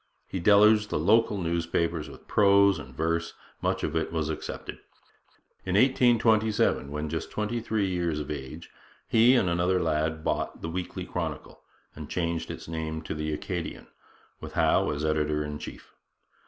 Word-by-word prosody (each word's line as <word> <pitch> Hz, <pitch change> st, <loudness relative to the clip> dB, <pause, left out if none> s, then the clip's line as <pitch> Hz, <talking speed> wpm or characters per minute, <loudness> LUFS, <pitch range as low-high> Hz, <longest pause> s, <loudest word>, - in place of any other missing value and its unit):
He 95 Hz, -, -4 dB
deluged 105 Hz, +3 st, +5 dB
the -, -, -1 dB
local 105 Hz, +6 st, +3 dB
newspapers 85 Hz, -2 st, -1 dB
with -, -, -14 dB
prose 100 Hz, -3 st, +4 dB
and 75 Hz, -, -10 dB
verse, 85 Hz, +1 st, -1 dB, 0.3 s
much -, -, -1 dB
of -, -, -1 dB
which 80 Hz, -1 st, -1 dB
was 80 Hz, -2 st, -2 dB
accepted. 75 Hz, -, -6 dB, 0.8 s
In 95 Hz, 0 st, -2 dB
1827, 110 Hz, -, +3 dB
when 75 Hz, +1 st, -3 dB
just 80 Hz, +1 st, -4 dB
twenty 105 Hz, +3 st, -2 dB
three 110 Hz, -3 st, -1 dB
years 85 Hz, -4 st, -1 dB
of 75 Hz, 0 st, -5 dB
age, 65 Hz, -3 st, -7 dB, 0.4 s
he 115 Hz, +3 st, +5 dB
and 115 Hz, -7 st, +3 dB
another 90 Hz, +2 st, +1 dB
lad 80 Hz, -1 st, -1 dB
bought -, -, -2 dB
the 80 Hz, -, -3 dB
Weekly 90 Hz, +1 st, -4 dB
Chronicle, -, -, -5 dB, 0.3 s
and 75 Hz, 0 st, -8 dB
changed 85 Hz, -2 st, -2 dB
its -, -, -7 dB
name 80 Hz, -1 st, -4 dB
to 80 Hz, -, -4 dB
the 75 Hz, 0 st, -3 dB
Acadian, 85 Hz, +2 st, -5 dB, 0.5 s
with -, -, -9 dB
Howe -, -, +3 dB
as 75 Hz, +1 st, -2 dB
editor 75 Hz, -1 st, 0 dB
in 75 Hz, 0 st, -5 dB
chief. -, -, -10 dB
85 Hz, 160 wpm, -27 LUFS, 75-100 Hz, 0.8 s, deluged